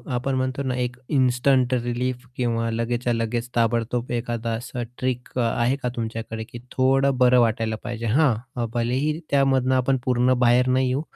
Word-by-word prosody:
आपण 130 +2 -1
म्हणतो 130 +1 -1
ना 130 -2 -1
एक 125 -1 -2
इन्स्टंट 130 -1 +2
रिलीफ 125 +1 -2
किंवा 115 -2 0
लगेचच्या 120 +1 -1
लगेच 115 +1 -2
ताबडतोब 115 +1 0
एखादा 120 -1 -2
असा 120 +1 -4
ट्रिक 125 0 -3
आहे 120 +2 +1
का 125 - 0
तुमच्याकडे 115 0 -4
की 120 +2 -10
थोडं 135 +1 +2
बरं 125 0 +5
वाटायला 110 -1 0
पाहिजे? 120 -1 -5
हां, 120 -1 +1
भलेही 130 +7 0
त्यामधून 135 -2 +2
आपण 130 +1 +2
पूर्ण 125 0 +3
बाहेर 125 +1 +4
नाही 130 0 +2
येऊ, 130 +3 0
125 Hz, 155 wpm, -23 LUFS, 115-130 Hz, -, बरं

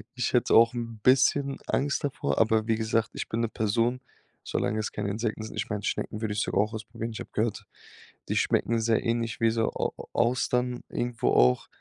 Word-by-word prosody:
Ich 125 -2 -1
hätte 125 - +3
auch 115 +1 +6
'n 115 -2 -5
bisschen 135 +2 +3
Angst 140 +1 0
davor, 140 -2 -1
aber 110 0 +3
wie 115 - +3
gesagt, 110 0 0
ich - - -4
bin 115 - -1
'ne 115 - 0
Person, 115 +4 0 0.4
solange 110 - -1
es 110 - -3
keine 100 - -3
Insekten 110 +1 -2
sind. 110 - -8
Ich - - -3
meine 105 -2 -3
Schnecken 105 - -3
würde 110 -2 -1
ich 105 - -1
sogar 100 - +1
auch 105 +2 -2
ausprobieren. 110 +1 -5
Ich 110 - -7
habe - - -8
gehört, 110 0 -1 0.6
die - - 0
schmecken 115 0 +1
sehr 115 0 +1
ähnlich 115 -1 -1
wie 115 0 +4
so 115 0 0
Au - - -2
Au - - -9
Austern 125 +1 +1
irgendwo 120 -1 -1
auch, 65 0 +4
115 Hz, 210 wpm, -27 LUFS, 110-120 Hz, 0.6 s, auch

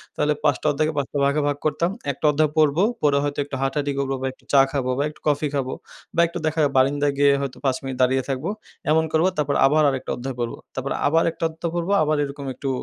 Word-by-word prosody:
তাহলে 150 0 +1
৫ 150 - +3
টা - - 0
অধ্যায়কে 155 +2 0
৫ 140 -1 0
টা - - -1
ভাগে 140 +2 +2
ভাগ 145 -1 0
করতাম। 155 +4 +1 0.2
১ 135 - -10
টা - - -1
অধ্যায় 150 0 +1
পড়বো, 155 +3 +4 0.2
পরে 145 -1 +4
হয়তো 145 0 -2
একটু 140 -1 -6
হাঁটাহাঁটি 140 +1 0
করবো 135 -1 -1
বা 130 - -1
একটু - - -28
চা 140 - +8
খাবো 135 -3 -1
বা 140 - +1
একটু 150 - -15
কফি 150 0 +2
খাবো 135 -2 -1 0.4
বা 170 - +4
একটু 170 +1 -7
দেখা 160 +1 -1 0.2
বারিন্দায় 145 +2 +2
গিয়ে 140 0 +5
হয়তো 135 -2 -4
৫ 130 -1 +2
মিনিট 135 -1 -5
দাঁড়িয়ে 130 +1 +3
থাকবো। 135 +6 -2 0.4
এমন 160 +1 +4
করবো 160 +3 +3
তারপর 145 -1 0
আবার 155 +3 +4
আরেকটা 135 -2 -3
অধ্যায় 130 +1 -5
পড়বো। 120 -1 -3 0.2
তারপর 130 +1 -3 0.2
আবার 165 +3 +3
১টা 165 - -8
অধ্যায় 165 +1 -5
পড়বো 175 +2 -1
আবার 155 0 +1
এরকম 140 0 -6
একটু 135 +2 -4
145 Hz, 240 wpm, -23 LUFS, 135-155 Hz, 0.4 s, চা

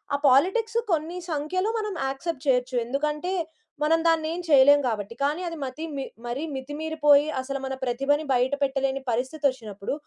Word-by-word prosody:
ఆ - - +1
పాలిటిక్సు 430 - +3
కొన్ని 325 +3 -2
సంఖ్యలో 340 +7 -1
మనం 425 -2 -3 0.2
యాక్సెప్ట్ 275 +1 -5
చేయొచ్చు. 255 -1 +2
ఎందుకంటే, 300 +7 -1 0.5
మనం 325 +2 +3
దాన్ని 325 -1 +3
ఏం 345 - -4
చేయలేం 285 -1 +7
కాబట్టి. 215 -2 -2
కానీ 295 +5 0
అది 335 -1 -5
మతి 270 +4 -5
మి 270 - -2 0.2
మరీ 240 +4 -3
మితిమీరిపోయి 295 +1 +2
అసలు 275 +1 -4
మన 265 - -3
ప్రతిభని 275 +5 +1
బయట 255 +2 +2
పెట్టలేని 270 0 0
పరిస్థితి 260 +6 -2
వచ్చినప్పుడు. 215 -4 -6
285 Hz, 155 wpm, -25 LUFS, 260-315 Hz, 0.5 s, చేయలేం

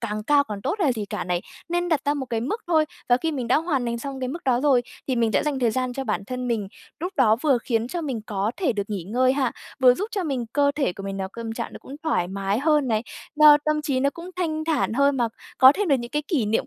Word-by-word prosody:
càng 215 -2 -3
cao 285 +3 +4
càng 205 -4 -7
tốt - - 0
hay 340 - +2
là 255 - +3
gì 215 -3 -4
cả - - -3
này. 175 -1 -1 0.3
Nên 350 +1 0
đặt 315 -4 +2
ra 290 - +1
một 275 -2 -4
cái 230 -2 -2
mức 430 - -2
thôi 320 -3 +3 0.2
và 245 - +5
khi 320 +4 -2
mình 250 -5 -3
đã 255 - +4
hoàn 305 -5 0
thành 235 0 -2
xong 270 +1 -6
cái 255 - -2
mức 330 +4 -6
đó 250 -2 +2
rồi, 270 -4 +4 0.3
thì 255 - +1
mình 230 -2 +1
sẽ - - +2
dành 290 -3 -1
thời 240 -3 +2
gian 255 +1 -1
cho 270 +1 -4
bản 210 -3 -2
thân 250 +1 -4
mình. 215 -5 -1 0.3
Lúc 360 +3 -3
đó 225 -5 +4
vừa 275 -5 +3
khiến 230 -1 0
cho 345 +6 -3
mình 265 -8 -3
có 205 +1 -1
thể 310 -10 +1
được 205 -2 -1
nghỉ 200 -4 -3
ngơi 255 +6 +2
ha, 270 -3 0 0.3
vừa 250 -1 +7
giúp 405 - -2
cho 390 -4 -2
mình 265 -6 -2
cơ 285 0 +3
thể 275 -11 0
của 195 - -9
mình 195 0 -4
nào 190 -1 -3
câm 230 -1 -5
trạng 230 0 -5
nó - - -8
cũng 275 - -10
thoải 180 - 0
mái 195 +2 -1
hơn 295 -2 +2
này, 220 -1 +1 0.3
lo 300 -1 +8
tâm 305 -1 +1
trí 275 -4 0
nó 280 +1 +2
cũng 345 +4 -9
thanh 315 -3 -1
thản 310 -8 0
hơn 280 +2 +3
mà 235 -2 +1 0.3
có 260 +1 +9
thêm 410 +3 -1
được 275 - +4
những 240 +1 -7
cái 295 +1 -1
kỷ 275 - +1
niệm 220 +2 0
260 Hz, 295 wpm, -24 LUFS, 230-300 Hz, 0.3 s, có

